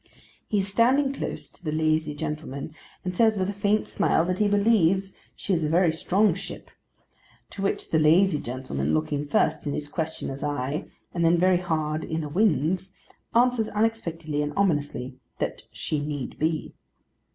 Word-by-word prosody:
He 210 - 0
is 195 -1 +1
standing 260 +7 +3
close - - -4
to - - -18
the 155 - -2
lazy 155 -1 +1
gentleman, 150 0 -5 0.3
and 180 0 -2
says 220 +1 +4
with 190 +1 0
a - - -7
faint 205 +2 +1
smile 165 - +2
that 180 +1 -1
he 210 - +4
believes 195 -3 +3 0.2
She 200 - -2
is 165 -3 +1
a 150 - 0
very 170 0 +3
strong 190 +4 +2
Ship; 195 - -8 0.8
to 200 - -7
which 195 - -1
the 160 - +4
lazy 160 +2 +4
gentleman, 115 - -2
looking 145 - -1
first 145 - +1
in 145 - -1
his 145 - -3
questioner's 155 -3 -4
eye 145 0 -2 0.3
and 170 - 0
then 165 +1 +5
very 185 +1 +4
hard 155 -3 -1
in 160 0 -2
the 150 - -5
wind's, 185 0 +1 0.4
answers 240 -2 +3
unexpectedly 170 -9 -1
and 150 0 -2
ominously, 145 -8 0 0.2
that - - -3
She 155 - -2
need 145 -3 -4
be. 155 0 -1
165 Hz, 170 wpm, -26 LUFS, 150-195 Hz, 0.8 s, then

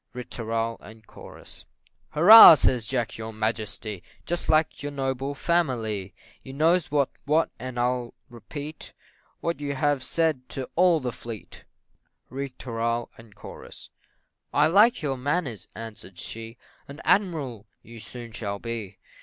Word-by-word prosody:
Ri 125 0 -6
tooral, 115 -1 -3 0.8
&c. - - -17 0.4
"Hurrah!" 180 +2 +10
says 125 -5 +1
Jack, 120 -3 -2
"your 110 0 -5
Majesty! 110 -2 -4 0.2
Just 175 0 -2
like 155 -2 +2
your 145 +1 -4
noble 135 0 -3
family! 115 - -1 0.3
You 130 - -10
knows 160 +1 +2
what's 145 -2 +1
what, 155 +3 +2
and 130 -1 -7
I'll 125 0 -1
repeat 140 +6 -9 0.5
What 170 -2 -2
you 140 -1 -3
have 145 0 +1
said 150 -2 -1
to 130 - -3
all 175 -2 +4
the 125 -1 -2
fleet." 115 -2 -10 0.7
Ri 135 +1 -4
tooral, 115 -2 -3
&c. 110 -3 -12 0.6
"I 145 - +4
like 205 +6 +4
your 135 -3 -1
manners," 135 - -2
answered 110 -4 -9
she, 115 +4 -8 0.3
"An 140 +3 -10
admiral 150 - 0 0.2
you 115 0 -12
soon 120 +1 -8
shall 100 -3 -4
be." 110 -3 -6
125 Hz, 135 wpm, -25 LUFS, 115-150 Hz, 0.8 s, Hurrah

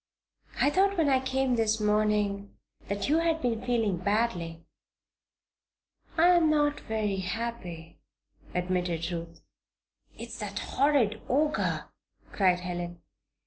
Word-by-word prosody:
"I 290 - +4
thought, 390 +3 +2
when 315 -4 +3
I 265 -1 +4
came 265 0 0
this 220 -1 +1
morning, 210 -1 0 0.3
that 200 0 -2
you 305 +3 +3
had 330 -1 +1
been 235 -5 -1
feeling 225 -6 +1
badly." 180 -5 -1 1.5
"I 335 +2 +6
am 345 -3 +5
not 295 -1 +2
very 215 -3 -2
happy," 180 -4 -5 0.6
admitted 180 -2 -1
Ruth. 170 -1 -6 0.8
"It's - - -8
that - - -5
horrid 270 -7 +1
Ogre!" 295 +4 +1 0.5
cried 180 -3 +2
Helen. 175 -1 -5
215 Hz, 115 wpm, -28 LUFS, 180-270 Hz, 1.5 s, I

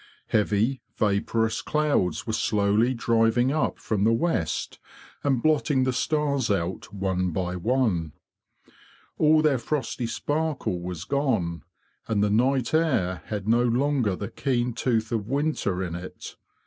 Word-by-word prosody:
Heavy 110 +5 +1
vaporous 110 +2 0
clouds 145 - 0
were 110 - -3
slowly 110 +3 +2
driving 115 +2 +2
up 155 +1 0
from 105 -3 -1
the 110 - +4
west 115 - -1 0.4
and 135 -4 +1
blotting 150 -3 +2
the 130 0 0
stars 140 -2 0
out 95 -1 -2
one 95 -2 -1
by 90 +1 -2
one. 90 - 0 1.1
All 155 0 +5
their 145 -5 +3
frosty 130 -2 -2
sparkle 145 - -2
was 90 -2 -5
gone, 110 -10 -1 0.5
and 105 -2 +1
the 105 - +1
night 125 +3 +2
air 130 - +1
had 105 -2 -4
no 115 +2 +4
longer 125 -3 +1
the 100 +1 -6
keen 125 -3 -1
tooth 115 -1 0
of 110 -3 -2
winter 140 -10 0
in 85 -3 -4
it. 90 +2 -8
115 Hz, 135 wpm, -26 LUFS, 100-135 Hz, 1.1 s, All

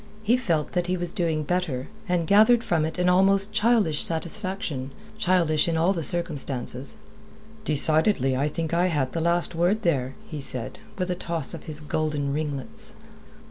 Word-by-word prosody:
He 225 +3 +3
felt 170 -12 -2
that 180 -1 -2
he 185 +1 -1
was 175 0 -5
doing 165 -6 -1
better, 150 -6 -3 0.2
and 175 -2 0
gathered 220 +6 +4
from 160 -3 0
it 160 - -4
an 180 0 0
almost 195 +3 +3
childish 210 -9 +2
satisfaction 170 -5 -2 0.3
childish 170 -4 +1
in 165 -1 -1
all 170 +4 +2
the 170 - -4
circumstances. 140 -6 +3 0.7
"Decidedly 155 -2 +1
I 140 +3 0
think 160 +1 -4
I 175 +2 +2
had 145 -7 -1
the 165 - -2
last 170 +1 0
word 175 +6 0
there," 135 -6 -1
he 155 -3 -7
said, 125 -3 0 0.2
with 185 -1 -2
a - - +1
toss 170 -4 +1
of 165 - -9
his 155 -1 -4
golden 150 -2 -2
ringlets. 145 -3 -6
165 Hz, 170 wpm, -24 LUFS, 150-180 Hz, 0.7 s, gathered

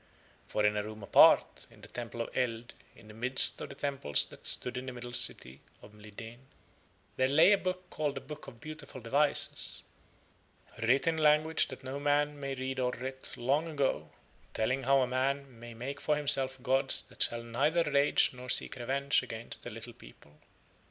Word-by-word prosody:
For 105 - 0
in 105 0 +2
a - - +1
room 110 0 -9
apart - - +5
in - - -19
the - - -12
Temple 120 -1 -6
of - - -6
Eld 120 -2 -2 0.2
in 105 - -17
the 105 - -12
midst 130 +4 +4
of - - -6
the 140 - -10
temples 135 - 0
that - - -10
stood 125 - -2
in 125 +1 -5
the - - -4
Middle 120 0 -8
City 65 - +2 0.2
of 105 - -14
Mlideen 105 +3 -11 0.8
there 130 - +3
lay 155 +8 +5
a 205 - +5
book 185 0 -4
called 150 -2 -2
the - - -5
Book 150 +2 -10
of 120 -4 -12
Beautiful 155 -1 -9
Devices, 140 +5 0 1.0
writ 125 +7 +2
in 165 -1 0
a - - -2
language 155 +1 +3
that 130 -1 -10
no 135 +2 -5
man 145 0 0
may 135 -1 -4
read 130 0 -4
and 125 -1 -1
writ 130 +1 -6
long 140 +7 0
ago, 140 -3 -1 0.5
telling 130 +5 0
how 135 0 +4
a 125 - +1
man 130 0 -2
may 120 0 -10
make 140 +5 -6
for 150 +1 +1
himself 135 -3 +3
gods 135 0 +2
that - - -13
shall 120 0 +1
neither 145 +9 +1
rage 145 -1 +3
nor 125 0 -10
seek - - +2
revenge 140 +3 0
against 115 +1 -5
a - - -4
little - - -8
people. 75 +5 -18
130 Hz, 190 wpm, -31 LUFS, 120-145 Hz, 1.0 s, apart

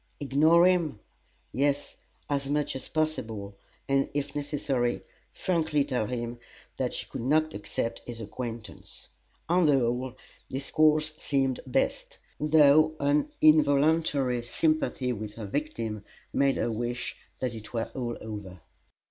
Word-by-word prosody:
Ignore 155 +5 +5
him? 170 - +2 0.5
Yes, 145 +1 0 0.3
as 140 -1 -1
much 150 -1 0
as 135 - -6
possible, 110 -11 -2 0.3
and, 135 0 +2
if 145 0 -2
necessary, 140 -4 -1 0.3
frankly 160 -5 0
tell 125 -6 -1
him 120 0 -4 0.4
that - - -1
she - - -4
could - - -6
not 155 +5 +2
accept 115 +3 -3
his 120 -2 -6
acquaintance. 115 -1 -7 0.4
On 175 -1 +4
the 145 -2 +5
whole, 125 +1 -1 0.3
this 135 +1 -4
course 155 0 +3
seemed 135 -2 +1
best, 125 - -1 0.2
though 155 +1 +5
an 145 - +2
involuntary 150 -4 +4
sympathy 130 -1 0
with 105 -1 -6
her 110 - -6
victim 115 -4 -3 0.3
made 140 -1 +3
her 120 - 0
wish 120 +2 -3 0.2
that 125 -2 -2
it 110 -1 -9
were 115 -1 -2
all 120 -3 -3
over. 105 -4 -7
135 Hz, 130 wpm, -28 LUFS, 120-150 Hz, 0.5 s, Ignore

